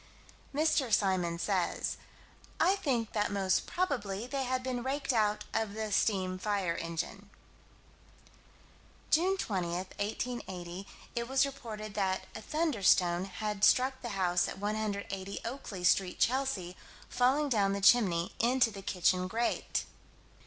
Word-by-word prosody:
Mr. 290 -4 +2
Symons 180 -5 +1
says: 190 -2 0 0.6
"I 385 - +4
think 255 - -1
that 210 -1 0
most 195 -2 +1
probably 235 - -1
they 270 +1 -2
had 255 0 -1
been 255 -1 -2
raked 275 +2 -1
out 210 -2 +2
of 220 -2 -1
the 220 -1 -3
steam 185 -3 +1
fire 195 -4 0
engine." 170 +5 -5 1.8
June 370 +5 +3
20, 190 - -1
1880, 190 0 -4 0.3
it 235 0 -2
was 270 +1 +4
reported 220 -6 -7
that 190 -2 0
a 220 - -7
"thunderstone" 200 - +2
had 205 +2 -4
struck 260 +3 +4
the 240 - -4
house 180 -1 +2
at - - -6
180 200 -2 -3
Oakley 230 -7 -6
Street, 180 +1 +3
Chelsea, 240 -9 0 0.3
falling 265 +4 +2
down 205 -6 +2
the 200 - -1
chimney, 190 -5 +4
into 240 0 +3
the 195 - -8
kitchen 185 -1 +1
grate. 230 +5 -1
210 Hz, 130 wpm, -31 LUFS, 190-250 Hz, 1.8 s, I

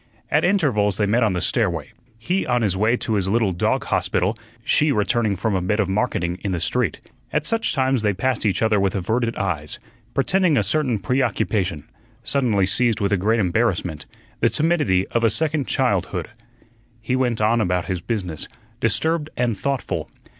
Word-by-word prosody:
At 150 - +3
intervals 130 - +2
they 105 - +2
met 115 +4 +2
on 110 -4 +2
the 90 - -2
stairway; 90 - 0 0.3
he 180 +12 -1
on 120 -1 +1
his 100 -4 +1
way 110 +5 +2
to 115 - -2
his 100 -3 +1
little 110 0 +2
dog 85 - 0
hospital, 95 +6 0 0.3
she 150 +5 +3
returning 105 -2 +1
from 100 +4 -1
a 95 - +1
bit 105 +4 0
of 105 - +2
marketing 95 -4 -1
in 100 -3 -1
the 90 - -1
street. 120 +8 0 0.3
At 150 0 0
such 225 +7 +1
times 130 -2 +2
they 105 -1 +2
passed 130 +4 -1
each 100 -1 +1
other 110 -2 +3
with 95 0 0
averted 115 +5 -1
eyes, 75 -6 -3 0.4
pretending 185 -6 +2
a 105 - +3
certain 125 +2 0
preoccupation, 100 - 0 0.4
suddenly 115 -9 +1
seized 115 +3 +1
with 100 0 0
a - - +5
great 110 +5 +1
embarrassment, 90 -5 0 0.3
the - - +3
timidity 150 - +1
of 115 - 0
a 115 - +5
second 155 +1 0
childhood. - - 0 0.7
He 125 +3 -1
went 125 -3 0
on 110 +2 +3
about 90 -3 0
his 90 -2 -3
business, 90 -6 -3 0.3
disturbed 155 +8 0
and 120 -2 +1
thoughtful. 100 - -3
110 Hz, 180 wpm, -22 LUFS, 95-125 Hz, 0.7 s, a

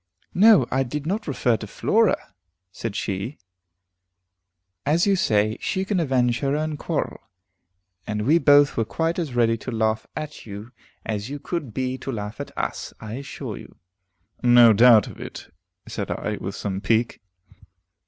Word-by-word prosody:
"No, 205 - +6
I 130 - +2
did 140 +3 -3
not 205 +5 -2
refer 125 -5 +1
to 105 - -8
Flora," 215 - +1 0.4
said 110 +1 -5
she. 100 +7 -3 1.5
"As 160 +4 +2
you 200 -1 +3
say, 110 - +1
she 190 0 -1
can 195 -2 0
avenge 125 -6 +1
her 140 0 0
own 155 0 -2
quarrel, - - -3 0.9
and 105 0 -2
we 155 +8 +4
both 145 -2 +5
were 115 - +1
quite 165 +9 -1
as 150 -8 -3
ready 115 -1 +3
to 115 - -8
laugh 110 -2 0
at 150 -1 -6
you, 105 +2 -9 0.3
as 105 +1 -3
you 145 - -4
could 150 -3 -4
be 130 +3 -3
to 135 - -5
laugh 105 +2 -5
at 140 - -6
us, - - -4
I 110 0 -7
assure 140 +1 -6
you." - - -13 0.7
"No 120 -2 +7
doubt 115 0 +7
of - - -11
it," - - -9 0.3
said - - -4
I, - - -3
with - - -5
some 95 -1 -4
pique. 115 +2 0
125 Hz, 165 wpm, -23 LUFS, 110-150 Hz, 1.5 s, No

